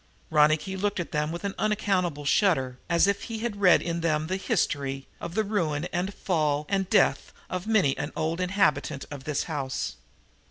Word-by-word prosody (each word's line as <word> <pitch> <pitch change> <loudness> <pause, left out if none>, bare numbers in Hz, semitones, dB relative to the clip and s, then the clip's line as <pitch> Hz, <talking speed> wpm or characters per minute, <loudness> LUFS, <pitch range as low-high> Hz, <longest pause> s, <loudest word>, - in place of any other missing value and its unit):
Ronicky 155 +5 +3
looked 200 +1 -1
at 175 - -4
them 150 +1 0
with 170 +3 -6
an 200 -1 -2
unaccountable 190 -8 0
shudder, 135 -8 +2
as 170 +1 +4
if 200 0 0
he 230 0 -3
read 200 -5 +4
in 170 0 -2
them 155 -2 +1
the 185 +4 -2
history 135 -7 -1
of 170 - -6
the 220 - +2
ruin 170 -7 -1
and 180 +3 -1
fall 150 -6 0
and 195 -2 0
death 210 -3 +3 0.2
of 185 +2 -3
many 195 -12 +3
an 145 - -3
old 165 +3 -1
inhabitant 180 -7 +1
of 140 -2 -8
this 150 -2 -1
house. 130 - -3
170 Hz, 175 wpm, -27 LUFS, 150-195 Hz, 0.2 s, as